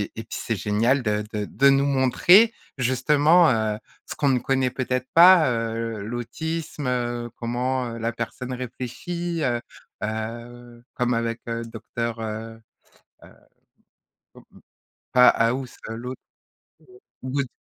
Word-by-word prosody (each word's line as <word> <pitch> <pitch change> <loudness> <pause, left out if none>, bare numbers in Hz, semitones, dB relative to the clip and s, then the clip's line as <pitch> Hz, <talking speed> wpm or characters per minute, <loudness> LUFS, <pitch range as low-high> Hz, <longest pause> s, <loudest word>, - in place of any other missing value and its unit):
et 115 - -6
puis 110 - -7
c'est 115 - -2
génial 115 +7 +1
de 105 -1 0
de 105 -1 -2
de 140 +6 +3
nous 135 0 +3
montrer, 145 - +5 0.2
justement, 150 +6 +4
heu, 110 -2 0 0.3
ce - - -7
qu'on 140 - +1
ne 130 -2 +2
connaît 130 0 0
peut-être 130 0 -2
pas, 175 -3 +8
heu, 115 -1 -3
l'autisme, 140 +7 -4
heu, 120 -1 -2
comment, 125 +2 -2
heu, - - -6
la 115 +1 -2
personne 120 +2 -5
réfléchit, 160 +8 -5
heu 120 -3 +1 0.4
heu, 120 +2 -6
comme 125 0 0
avec 115 0 -2
Docteur, 115 0 -5
heu 110 +1 -6 0.7
heu - - -14 1.1
mmh - - -15 0.7
pas 125 0 +7
House 125 +3 0
l'autre, 125 +3 -6 1.0
Good. 135 +1 -2
120 Hz, 125 wpm, -24 LUFS, 115-135 Hz, 1.1 s, pas